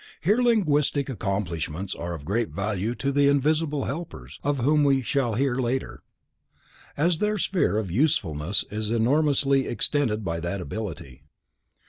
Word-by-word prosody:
Hence 205 +8 +3
linguistic 150 - +2
accomplishments 95 - -3
are 85 0 -5
of 70 -3 -10
great 110 +6 0
value 105 +3 -2
to 140 +2 -1
the 140 0 +3
"Invisible 150 +1 +1
Helpers", 165 +5 -7
of 145 0 0
whom 145 +4 +3
we 135 -2 +3
shall 120 -1 0
hear 130 +1 +1
later, 130 +1 -2 1.0
as 165 +2 +2
their 210 0 +1
sphere 180 - +1
of 105 -5 -2
usefulness 95 - +1
is 105 0 -3
enormously 135 +3 +2
extended 115 -5 0
by 85 -1 -2
that 85 +4 -3
ability. 75 - -6
125 Hz, 140 wpm, -25 LUFS, 100-145 Hz, 1.0 s, Hence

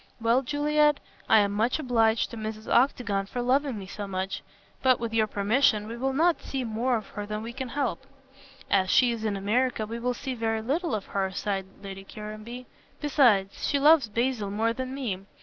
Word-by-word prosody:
Well, 230 +3 +3
Juliet, 295 +2 +2 0.3
I 220 -1 +7
am 200 0 +1
much 220 +4 +1
obliged 230 -6 +2
to - - -6
Mrs. 220 -1 -6
Octagon 225 -6 +2
for 245 - -5
loving 265 0 +1
me 195 - -7
so 200 +1 -6
much, 190 0 -3 0.4
but, 255 -1 +4
with 230 -1 -4
your 220 -1 +3
permission, 210 +1 +2
we 230 - -6
will 265 +3 -1
not 330 +5 +2
see 270 -2 -3
more 235 +2 0
of 215 - -8
her 205 -1 -6
than 215 +1 -4
we 230 +1 -6
can 260 0 -5
help." 270 0 -2 0.6
"As 190 -2 +3
she 245 +3 +5
is 230 -2 -4
in 210 -2 -1
America 220 +3 0
we 230 +2 -5
will 245 +1 -1
see 265 +1 -4
very 225 -2 -1
little 290 +2 0
of 205 - -4
her," 195 -1 -1
sighed 195 0 -3 0.2
Lady 195 -1 -7
Caranby, 215 +5 -8 0.3
"besides, 240 -10 +2
she 285 - +2
loves 290 -4 +5
Basil 230 -2 -1
more 225 +3 0
than 260 +2 -5
me. 235 -9 -3
230 Hz, 200 wpm, -27 LUFS, 210-260 Hz, 0.6 s, I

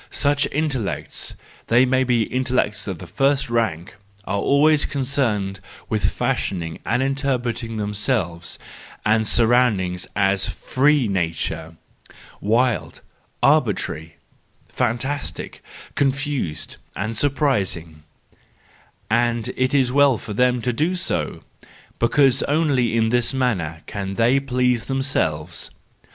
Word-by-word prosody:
Such 145 0 +2
intellects—they 130 -3 -1
may 130 +1 +2
be 120 -3 +2
intel¬ 130 0 -2
lects 105 +1 -6
of 95 -3 -3
the 90 - -9
first 135 - +1
rank—are 100 -1 -3
always 145 +7 +4
concerned 120 -8 -1 0.3
with 110 -2 +1
fashioning 85 -4 -2
or - - 0
interpreting 125 -3 -1
themselves 105 -5 -2 0.5
and 110 +1 +4
their - - +3
surroundings 110 -7 +2
as 95 -1 +2
free 140 -1 +1
nature—wild, 90 +6 -3 0.4
arbitrary, 80 +1 +1 0.6
fan¬ 120 -1 +1
tastic, 145 +3 -4 0.3
confused 140 - -1 0.2
and 110 +2 -3
surprising: 105 - 0 1.1
and 120 0 +1
it 130 +2 +1
is 130 -3 +3
well 140 -2 +4
for 105 - -7
them 125 +1 +2
to 125 - 0
do 160 +9 0
so, 85 - -2 0.6
because 135 +2 +4
only 140 -7 +2
in 110 -1 +2
this 120 +2 +1
manner 90 -12 -1
can 95 -1 -5
they 120 +5 +3
please 125 -3 0
themselves 85 - -1
120 Hz, 110 wpm, -22 LUFS, 100-135 Hz, 1.1 s, always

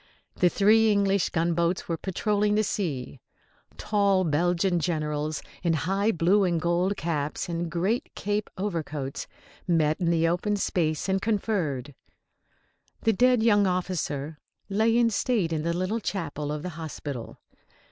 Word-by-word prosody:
The 180 - +4
three 220 +3 +4
English 200 -2 +2
gunboats 170 +1 0
were 170 - -1
patrolling 205 +4 0
the 215 - +3
sea. 145 -11 -3 0.6
Tall 200 -3 +2
Belgian 175 +3 +1
generals, 155 -2 -2 0.2
in 170 -2 +1
high 195 +7 +1
blue 185 +3 +3
and 175 -3 +1
gold 175 +4 +1
caps 150 -2 -2
and 170 0 -3
great 185 +8 -1
cape 205 +1 -2
overcoats, 155 -8 -3 0.4
met 160 -1 +2
in 170 - +2
the 165 -1 +3
open 180 +5 0
space 165 -5 -1
and 190 0 +1
conferred. 185 - -1 1.1
The 225 - +3
dead 250 +1 +3
young 205 -3 +4
officer 160 -5 -2 0.3
lay 220 +3 +2
in 235 -1 +3
state 210 -7 0
in 155 - -1
the 170 +2 -1
little 185 +5 -1
chapel 150 -8 -3
of 150 0 -4
the 180 - -3
hospital. 150 -6 -7
175 Hz, 140 wpm, -26 LUFS, 160-205 Hz, 1.1 s, The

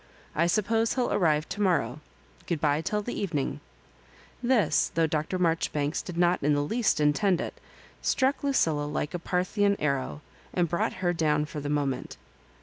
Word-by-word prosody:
I 170 +3 +2
suppose 220 +4 +1
he'll 250 -2 0
arrive 155 -4 +2
to 210 - -4
morrow. 155 - +1 0.5
Good 170 -3 -1
bye 150 0 +2
till 210 +5 -1
the 240 - -4
evening." 165 -9 -2 0.8
This, 240 -3 +2
though 165 0 +3
Dr. 155 +3 -1
Marjoribanks 165 -4 0
did 175 -2 -7
not 175 +1 +3
in 145 +1 +3
the 145 - +1
least 225 +3 +1
intend 170 +5 +3
it, - - -4 0.5
struck 265 +2 +1
Lucilla 160 - +1
like 150 0 -3
a 175 - -2
Parthian 200 +4 +1
arrow, 140 0 -1 0.3
and 175 -1 +2
brought 170 +1 0
her 175 - +3
down 150 -3 +1
for 150 0 -6
the 145 0 -4
moment. 140 -3 -2
165 Hz, 165 wpm, -28 LUFS, 150-200 Hz, 0.8 s, though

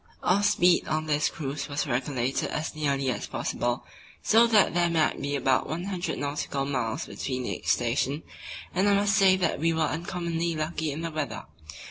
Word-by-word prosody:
Our 190 +3 +3
speed 180 -4 +3
on 155 0 -1
this 150 0 +1
cruise 145 -2 -5
was 145 0 -1
regulated 130 -1 -1
as 155 - -3
nearly 140 -3 0
as - - -4
possible 120 +1 -2 0.4
so 230 +2 +5
that 215 -4 +4
there 175 0 +2
might 160 -2 +1
be 145 0 -2
about 135 -1 +1
100 180 +3 -3
nautical 140 -1 -2
miles 125 -5 -2
between 125 +5 -4
each - - -5
station, 130 +5 +1 0.5
and 190 +3 +2
I 200 - +5
must 200 +1 +2
say 190 -3 +5 0.2
we 165 +2 +1
were 160 - -1
uncommonly 170 +2 -2
lucky 155 0 -2
in 150 +3 -5
the 165 -1 -3
weather. 155 -2 -4
155 Hz, 170 wpm, -27 LUFS, 140-175 Hz, 0.5 s, so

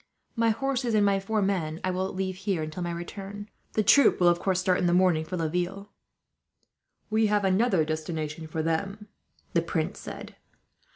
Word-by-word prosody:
My 230 -1 +2
horses 250 0 0
and 205 -1 +4
my 200 -1 +3
four 210 +2 -1
men 170 -5 -1
I 185 - 0
will 185 +1 -2
leave 190 -1 -3
here, 195 -4 -1
until 155 +3 -6
my 175 0 -2
return. 195 +4 -7 0.2
The 215 - +2
troop 280 +3 +5
will, 175 -1 +6
of 175 0 +2
course, 190 -2 0
start 185 -1 +2
in 180 - +1
the 175 - +3
morning 180 -4 +3
for 180 - -4
Laville." 180 +5 -2 1.2
"We 220 0 +3
have 205 -1 +1
another 190 -3 +3
destination 155 0 -4
for 160 0 -3
them," 195 +6 -2 0.4
the - - +3
prince - - -2
said. - - -8
185 Hz, 180 wpm, -27 LUFS, 170-205 Hz, 1.2 s, will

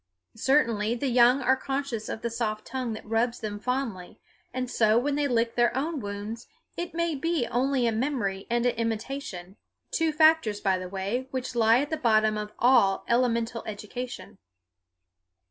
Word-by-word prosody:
Certainly 230 -4 +2
the 265 +3 -1
young 250 +2 +5
are 260 +1 +4
conscious 270 -4 -3
of 220 - -5
the 235 - -2
soft 215 -2 -2
tongue 255 -3 -3
that 220 - -8
rubs 225 +2 0
them 205 -1 -5
fondly, 235 -7 -3 0.3
and 255 0 -3
so 220 -2 +3
when 280 +4 +1
they 290 0 +1
lick 230 -2 +1
their 240 +1 +2
own 305 +2 -1
wounds 205 +1 -6 0.3
it 345 -1 -5
may 335 -1 0
be 310 -1 0
only 260 +1 +1
a 230 - +2
memory 220 -5 -2
and 235 +1 +1
an 245 - +3
imitation, 225 -5 -4 0.3
two 325 -1 +1
factors, 310 -9 +4
by 190 -2 +1
the 185 0 -6
way, 200 +7 -3
which 255 -1 -4
lie 230 +1 +4
at 290 - -4
the 315 - 0
bottom 215 -3 +3
of 210 0 -4
all 235 -6 +4
elemental 235 -1 +1
education. 215 - -7
235 Hz, 170 wpm, -27 LUFS, 215-265 Hz, 0.3 s, young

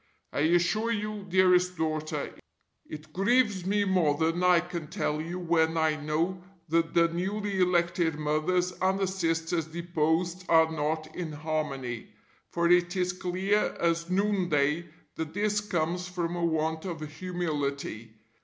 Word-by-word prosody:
I - - -1
assure 175 +8 +2
you, 210 -2 -3
dearest 180 -1 +4
daughter, 155 -1 -2 0.6
it 155 0 -9
grieves 200 -1 +2
me 205 +1 +2
more 175 -7 +2
than 165 +3 0
I 180 -1 +6
can 170 -2 -5
tell 150 0 -2
you 170 +3 -5
when 165 -2 +1
I 160 -1 +2
know 155 +5 -1 0.3
that 165 +1 +1
the 170 0 +5
newly 195 +3 -2
elected 175 -2 +2
Mothers 155 +4 0
and 190 +1 +2
the 195 - +1
Sisters 165 -3 -1
deposed 170 +2 -1
are 160 -1 +5
not 155 0 -2
in 170 -3 -4
harmony; 145 -6 -3 0.4
for 170 0 +1
it 175 +1 +3
is 180 -1 0
clear 185 +3 0
as 170 0 0
noon 195 -1 +1
day 150 +4 +1 0.3
that 160 0 -4
this 210 0 +1
comes 180 -2 -1
from 175 -1 -3
a 175 - -2
want 160 -1 0
of 170 -4 -5
humility. 150 -8 -3
170 Hz, 145 wpm, -28 LUFS, 155-185 Hz, 0.6 s, I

